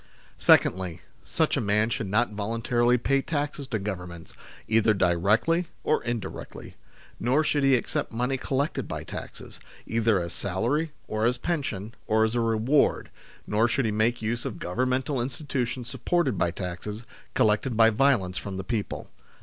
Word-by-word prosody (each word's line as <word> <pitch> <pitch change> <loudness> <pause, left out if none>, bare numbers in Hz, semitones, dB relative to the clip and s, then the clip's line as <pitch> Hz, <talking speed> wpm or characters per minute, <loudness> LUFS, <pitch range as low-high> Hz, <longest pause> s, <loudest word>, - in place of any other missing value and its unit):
Secondly, 90 -2 +3 0.2
such - - +1
a - - 0
man 105 +2 +2
should 110 - -2
not 105 +4 +1
voluntarily 115 +3 +1
pay 135 +3 +1
taxes 145 -2 -3
to 115 - -1
Governments, 90 -4 -6 0.3
either 110 -1 +3
directly 100 - +2 0.2
or - - +1
in 120 0 -1
directly; 95 - -8 0.5
nor 130 +6 +2
should 145 -2 +1
he 135 -1 +5
accept 120 - -2
money 125 +4 0
collected 135 +3 -1
l>y - - -4
taxes, - - -8 0.3
either 115 -3 +2
as 85 -1 -4
salary, 125 - -1 0.2
or 110 +1 -1
as 125 +1 +1
pension, 120 - -3
or 110 0 +4
as 110 - -1
a 120 - +1
reward, 115 +6 +2 0.3
nor 110 +3 +2
should 135 +1 0
he 110 - +1
make 110 +2 +1
use 120 +2 -1
of - - -4
Govern 125 +9 -1
mental 130 +1 0
institutions 130 -2 -3
supported 155 - 0
by 90 - +1
taxes 95 +5 -5 0.3
collected 110 +3 +2
by 115 0 +6
violence 105 -7 +2
from 95 -2 -6
the 95 - -4
people. 110 -1 -4
115 Hz, 160 wpm, -27 LUFS, 105-130 Hz, 0.5 s, by